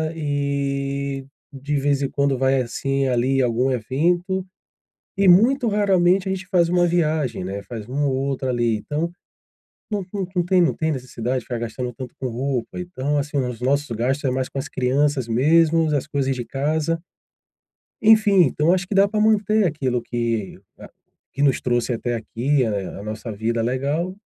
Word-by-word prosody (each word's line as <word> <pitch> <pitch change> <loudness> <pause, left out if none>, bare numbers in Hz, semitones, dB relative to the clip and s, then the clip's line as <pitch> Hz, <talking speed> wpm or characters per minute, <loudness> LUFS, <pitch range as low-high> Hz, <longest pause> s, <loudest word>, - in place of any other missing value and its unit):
e 140 -2 -2 0.3
de 140 +1 -4
vez 140 0 +1
em 135 - 0
quando 140 -1 0
vai, 135 +1 +2
assim, 135 +3 -1
ali, 130 +2 +1
algum 125 +2 +1
evento. 175 - 0 0.7
E 195 0 +3
muito 235 +8 +5
raramente 195 -2 +2
a - - 0
gente 190 -1 -4
faz 175 -3 +2
uma 175 0 +3
viagem, 155 - 0
né, 100 +2 -4
faz 110 -4 -8
um 140 +4 -2
ou 135 - 0
outro, 135 0 -2
ali, 120 -3 +1
então, 150 +9 -3 0.8
não 205 -2 -1
não 195 -2 -3
não 175 - +3
tem 180 0 +3
não 170 - +2
tem 160 0 -1
necessidade 130 -2 -3
de - - -17
ficar 120 - -4
gastando 120 +2 -4
tanto 125 +1 -9
com 130 - -3
roupa, 125 +5 -3
então 150 -5 -2
assim, 145 +1 -3
os 125 -4 -2
nossos 140 +3 +1
gastos 130 +6 -1
é 135 - +2
mais 130 0 -1
com - - -6
as 135 - -3
crianças 130 0 0
mesmo, 155 +5 +3
as 140 0 -1
coisas 140 -3 -1
de 125 -2 -5
casa. 155 +4 -1 1.0
E 220 - +3
enfim, 210 -4 +6
então 150 +1 0
eu 175 - +6
acho 185 0 -1
que 200 - -3
dá 195 +1 +6
pra 215 +1 -1
manter 215 -1 +3
aquilo 135 -7 -1
que 115 -4 -3 0.2
a - - -11 0.4
que 140 - -1
nos 135 -3 +3
trouxe 120 0 0
até 120 0 -2
aqui, 125 +4 0
a 100 -3 -3
a - - -8
nossa 110 +2 -6
vida 115 +3 -1
legal 140 +9 -1
140 Hz, 185 wpm, -22 LUFS, 125-170 Hz, 1.0 s, enfim